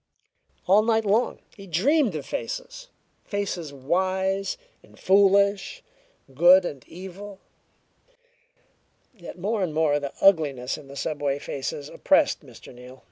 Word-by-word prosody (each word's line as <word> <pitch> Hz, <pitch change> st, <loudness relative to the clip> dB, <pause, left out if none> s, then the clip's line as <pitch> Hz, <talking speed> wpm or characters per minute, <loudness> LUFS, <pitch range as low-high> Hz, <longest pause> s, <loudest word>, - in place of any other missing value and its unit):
All 195 Hz, +3 st, +5 dB
night 220 Hz, 0 st, +1 dB
long 215 Hz, +5 st, +1 dB, 0.2 s
he 195 Hz, -2 st, -12 dB
dreamed 230 Hz, -, +2 dB
of 145 Hz, -3 st, -5 dB
faces -, -, -6 dB, 0.4 s
faces 190 Hz, -6 st, -4 dB
wise 190 Hz, +7 st, -1 dB, 0.2 s
and -, -, -21 dB
foolish, 200 Hz, -, +3 dB, 0.5 s
good 175 Hz, +6 st, +6 dB
and 140 Hz, -6 st, -6 dB
evil. 190 Hz, +3 st, -10 dB, 1.8 s
Yet 175 Hz, -3 st, -11 dB
more 205 Hz, +4 st, -2 dB
and 165 Hz, -5 st, -2 dB
more 155 Hz, -2 st, +2 dB
the 140 Hz, -1 st, -6 dB
ugliness 145 Hz, -10 st, +2 dB
in 140 Hz, -, -12 dB
the 140 Hz, -, -11 dB
subway 145 Hz, -2 st, -2 dB
faces 140 Hz, 0 st, -5 dB
oppressed -, -, +1 dB
Mr. -, -, -14 dB
Neal. 125 Hz, +1 st, -13 dB
185 Hz, 125 wpm, -25 LUFS, 145-205 Hz, 1.8 s, good